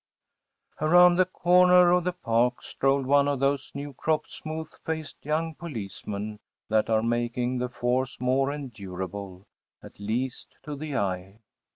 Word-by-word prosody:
‚ÄĚ 155 - +2
Around 175 +1 +7
the 185 - +5
corner 180 0 +5
of 180 0 +3
the 180 - +1
park 125 -6 0
strolled 135 0 +1
one 140 +1 +4
of 140 -2 0
those 140 0 0
new 140 0 -5
crop, 155 +4 0
smooth 160 0 -5 0.2
faced 160 -1 -5
young 160 +2 -1
policemen 105 - -6 0.3
that 110 0 +2
are 110 -1 +2
making 120 +2 -1
the 125 0 -2
force 125 +2 -1
more 130 +2 +1
endurable‚ÄĒat 100 - -8
least 120 +5 -3
to 150 - -5
the 145 -1 -4
eye. 95 0 -2
130 Hz, 145 wpm, -27 LUFS, 110-155 Hz, 0.3 s, Around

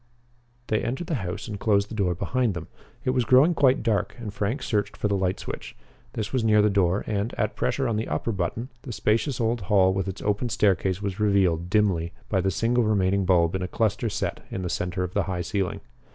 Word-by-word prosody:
They 110 -2 0
entered 135 +8 -3
the 165 - -3
house 90 +3 -5
and 105 -3 -5
closed 100 -2 +2
the - - -7
door 95 -5 0
behind 120 +2 0
them. 85 -2 -6 0.4
It 130 - +2
was 125 -1 +1
growing 130 +8 +5
quite 135 -6 +3
dark 105 -3 0
and 110 -4 -6
Frank 110 +8 -2
searched 105 -2 -1
for - - 0
the 100 - +1
light 95 -1 0
switch. - - -7 0.4
This 110 +2 -4
was 130 -3 +1
near 105 -1 +4
the 105 - +3
door, 95 0 +2
and, 105 +2 -2
at 105 0 -1
pressure 135 -2 0
on 115 -2 0
the 110 - -2
upper 115 - -1
button, 100 +6 -3
the 135 - -8
spacious 115 +6 0
old 115 0 0
hall 95 0 +3
with 95 0 -2
its 95 0 -5
open 105 +4 0
staircase 95 -2 +1
was 100 -1 -3
revealed 95 -5 +2
dimly 90 -5 +1 0.2
by 95 -3 +2
the 95 - +1
single 115 +6 +1
remaining 100 -2 +2
bulb 85 -2 +3
in 95 - -2
a 90 - -2
cluster 110 +4 0
set - - -3
in 95 - -4
the 90 - -2
center 90 +1 -2
of 90 0 -4
the 100 -3 +1
high 90 -2 -1
ceiling. 95 +1 -2
100 Hz, 225 wpm, -25 LUFS, 95-115 Hz, 0.4 s, growing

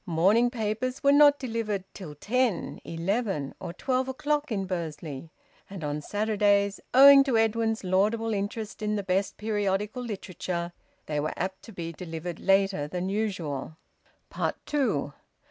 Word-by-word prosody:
Morning 195 +9 +3
papers 240 +3 -3
were 280 - +6
not 290 0 +7
delivered 225 -6 -3
till 155 -7 -9
ten, 235 - -1
eleven, 170 - -2
or - - -5
twelve 255 +7 -1
o'clock 290 +2 -1
in 195 -3 -1
Bursley, 160 -4 -5 0.4
and 190 -4 -8
on 150 0 -2
Saturdays, 205 0 +1
owing 275 +1 +9
to 265 -4 +1
Edwin's 225 0 +1
laudable 215 +5 +1
interest 205 +2 -4
in 210 0 0
the 205 - -2
best 190 +1 -1
periodical 210 +1 -1
literature, 185 -6 -4 0.3
they 150 -1 -2
were 150 +1 -2
apt 190 +1 -3
to - - -11
be 170 -4 -5
delivered 165 0 -6
later 195 -6 +2
than 180 +4 -3
usual. 170 -9 -3 0.9
TWO. 215 - 0
200 Hz, 140 wpm, -27 LUFS, 175-225 Hz, 0.9 s, owing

